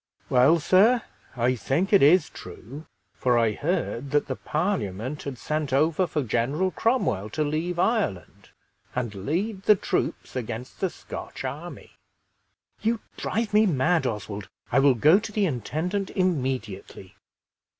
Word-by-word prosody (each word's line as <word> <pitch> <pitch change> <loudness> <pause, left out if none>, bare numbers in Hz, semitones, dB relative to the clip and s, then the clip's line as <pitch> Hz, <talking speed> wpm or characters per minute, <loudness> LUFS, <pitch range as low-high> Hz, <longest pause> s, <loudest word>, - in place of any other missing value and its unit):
"Well, 130 +6 +5
sir, 215 +9 +4 0.3
I 120 +2 +2
think 160 - -1
it 200 - +7
is 155 +4 +6
true, 145 +6 -11 0.3
for 125 -2 +1
I 115 -2 +3
heard 140 - -2
that 145 +1 +2
the - - -3
Parliament 150 - -2
had 140 -3 -6
sent 150 +5 -2
over 155 +6 +2
for 150 -3 -1
General 135 - 0
Cromwell 145 - 0
to 155 +8 -1
leave 160 +4 -2
Ireland, 190 - -1 0.5
and 120 -4 -2
lead 180 - -2
the 210 - +7
troops 190 - -3
against 120 0 -5
the 190 - 0
Scotch - - -8
army." - - -7 0.9
"You 225 +1 +1 0.2
drive 225 -1 -2
me 215 +1 +5
mad, 155 -1 +2
Oswald! 105 -3 -5 0.2
I - - +4
will 135 -1 +5
go 155 - +5
to 215 0 -7
the 210 -1 +1
intendant 180 - -2
immediately!" 130 - -2
150 Hz, 140 wpm, -25 LUFS, 125-185 Hz, 0.9 s, it